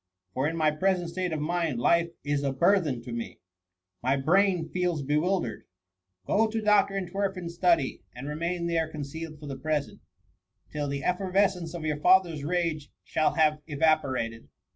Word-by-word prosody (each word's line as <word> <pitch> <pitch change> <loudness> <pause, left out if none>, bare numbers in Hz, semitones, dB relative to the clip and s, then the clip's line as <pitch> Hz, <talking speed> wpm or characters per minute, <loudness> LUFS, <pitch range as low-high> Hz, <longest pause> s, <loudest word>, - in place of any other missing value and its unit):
For 130 +6 0
in 165 +1 -3
my 155 -1 +3
present 175 +2 0
state 180 0 -2
of 155 - -2
mind, 160 -4 -1
life 170 +6 +3
is 145 -1 0
a 140 -1 0
burthen 160 -5 +2
to 120 - -8
me; 115 0 -5 0.3
— 90 0 -58
my 130 +3 +1
brain 175 +3 +2
feels 180 -5 -1
bewildered.'' 150 -1 -1 0.3
" 90 0 -51
Go 220 - +3
to 220 +1 -2
Dr. 210 -2 +3
Entwerfen's 190 -2 -3
study, 170 -6 +2
and 125 +3 -7
remain 170 +3 -2
there 165 -2 0
concealed 155 +1 -7
for 150 - -10
the 135 -2 -5
present, 150 0 -2 0.7
till 150 -1 -2
the 140 -1 -3
effer 185 +4 -1
vescence 185 -4 +1
of 165 -2 -5
your 150 -1 0
father's 175 -3 +4
rage 165 -2 -1
shall 155 - 0
have 155 -1 +3
eva 155 +1 +3
porated. 115 -4 -4
160 Hz, 175 wpm, -28 LUFS, 140-180 Hz, 0.7 s, father's